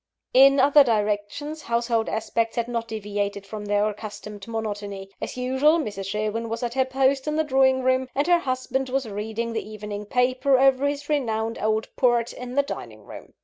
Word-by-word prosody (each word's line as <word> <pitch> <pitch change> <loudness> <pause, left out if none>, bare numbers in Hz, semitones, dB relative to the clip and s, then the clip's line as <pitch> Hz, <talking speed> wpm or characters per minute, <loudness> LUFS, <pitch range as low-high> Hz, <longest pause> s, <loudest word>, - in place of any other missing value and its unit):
In 275 +1 +7
other 285 +2 +7
directions, 215 +7 -1
household 235 -2 0
aspects 225 +1 -1
had 235 -1 -1
not 230 -1 -3
deviated 205 -2 -3
from 210 0 -7
their 205 +1 +2
accustomed 210 -1 -7
monotony. 205 -3 -5
As - - -5
usual, 265 +6 +3
Mrs. 205 - -4
Sherwin 215 +3 -2
was 230 +2 -4
at 240 -1 -2
her 260 0 +2
post 265 +1 +1
in 300 - 0
the 315 - +2
drawing 265 -2 +3
room; 260 0 +2
and 285 +2 +1
her 350 0 +4
husband 260 -1 -2
was 265 -1 -1
reading 220 +3 -4
the 220 -1 -4
evening 210 -1 -6
paper, 255 +3 +2
over 270 +1 +4
his 290 0 -3
renowned 230 -6 -1
old 220 +1 0
port, 240 -2 +2
in 250 0 -7
the 280 - +4
dining 110 - -8
room. - - -12
235 Hz, 185 wpm, -24 LUFS, 210-265 Hz, -, In